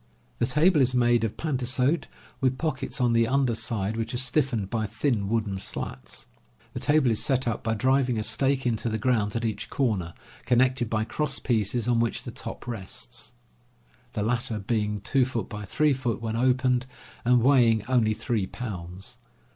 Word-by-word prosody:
The 120 - +2
table 150 +4 +4
is 130 0 +2
made 120 -1 +3
of 110 - -2
pantasote, 135 +1 0 0.3
with 130 -1 +1
pockets 135 -3 -2
on 120 -2 +3
the 115 0 +3
under 135 -1 +2
side 110 -2 -1
which 115 +2 -3
are - - 0
stiffened 125 -5 0
by 110 -2 -1
thin 110 -2 -1
wooden 105 -4 -1
slats. 65 -8 -4 0.5
The - - -4
table 150 -5 +3
is 110 - +1
set 130 -2 +1
up 115 -2 -1
by 110 -1 -1
driving 130 0 +2
a 110 - -1
stake 135 +5 +1
into 115 -1 0
the 110 - -1
ground 110 -3 +1
at 115 0 -1
each 110 -2 -3
corner, 100 -11 -1 0.3
connected 125 -1 +2
by 110 -1 0
cross 150 +5 -1
pieces 115 0 0
on 120 -1 +3
which 115 0 -1
the - - -6
top - - -7
rests, 95 - -6 0.8
the 105 - -1
latter 120 0 +1
being 105 0 -1
2x3 130 +2 0
feet 125 -4 -2
when 115 -1 -3
opened, 125 0 +2 0.4
and 120 -1 +4
weighing 120 -5 +4
only 115 -4 +2
3 110 -5 -1
pounds. 95 -6 -7
120 Hz, 170 wpm, -26 LUFS, 110-130 Hz, 0.8 s, table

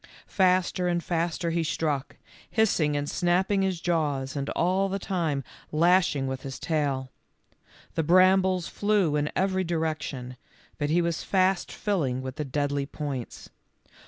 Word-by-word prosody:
Faster 185 -1 +2
and 175 -1 0
faster 170 0 -1
he 165 0 0
struck, 150 -3 -2 0.3
hissing 165 -10 +2
and 145 0 -2
snapping 185 +4 +1
his 190 -3 0
jaws 150 -6 -1
and 140 -1 -2
all 185 +3 +2
the 195 - -1
time 165 -8 -1 0.3
lashing 165 -3 +3
with 130 0 -3
his 135 -1 -6
tail. 140 -5 -1 0.8
The - - 0
brambles 185 +1 +4
flew 205 -7 +1
in 150 0 0
every 190 0 +1
direction, 155 -7 -3 0.4
but 145 -1 0
he 170 +3 +3
was 170 -1 -1
fast 190 -1 +1
filling 140 -11 -1
with 130 +1 -6
the 150 - -2
deadly 140 0 -1
points. 140 -5 -6
165 Hz, 140 wpm, -27 LUFS, 145-185 Hz, 0.8 s, brambles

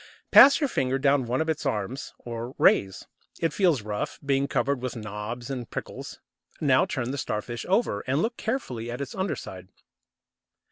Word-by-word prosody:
Pass 280 +3 +9
your 290 - +1
finger 130 - 0
down 140 -2 +2
one 125 +4 0
of 160 - -1
its 160 -1 -1
arms, 105 +6 -3
or 120 +2 -6
rays. 95 -2 +3 0.3
It 165 -2 0
feels 170 - +2
rough, 105 0 -4
being 140 0 +2
covered 140 -2 0
with 130 0 -4
knobs 110 +3 -6
and 125 -3 -5
prickles. - - -7 0.4
Now 130 -4 +3
turn 125 -1 -2
the 140 - -3
Starfish 120 +1 -4
over, 195 - +2
and 135 +3 +1
look 230 +7 0
carefully 130 - -3
at 120 +2 -5
its 140 -2 -5
underside. 95 - -4
130 Hz, 170 wpm, -26 LUFS, 115-145 Hz, 0.4 s, Pass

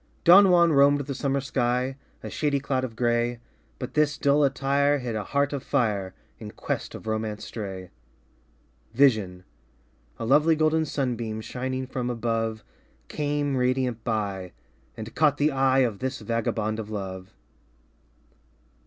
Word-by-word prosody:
Don 190 +3 +8
Juan 170 -2 +5
roamed 140 +1 +5
the 140 0 -5
summer 140 0 -1
sky 125 0 -1 0.3
A - - -5
shady 145 -2 0
cloud 130 -1 -1
of 120 -3 -5
gray 120 0 0 0.4
But - - -6
this 150 -1 +2
dull 145 +1 +3
attire 140 +1 +2
Hid 125 -4 -4
a 105 - -2
heart 140 +4 0
of 140 - -3
fire 105 -9 -1 0.2
In - - -8
quest - - -4
of - - -10
romance 110 -1 -3
stray. 95 -4 -7 1.0
Vision 110 -9 +2 0.7
A - - -4
lovely 150 +6 +4
golden 155 +1 +2
sunbeam 120 -6 -3
Shining 130 +3 -4
from 125 -1 -4
above 115 -2 -2 0.5
Came 145 -1 -1
radiant 125 -2 0
by 100 -5 -3 0.4
And 110 0 -7
caught 150 -2 +3
the 150 +1 +2
eye 135 0 +3
Of 115 -6 0
this 130 +1 -3
vagabond 110 -1 -2
of 110 -1 -6
love. 95 -3 -6
130 Hz, 145 wpm, -26 LUFS, 110-140 Hz, 1.0 s, Don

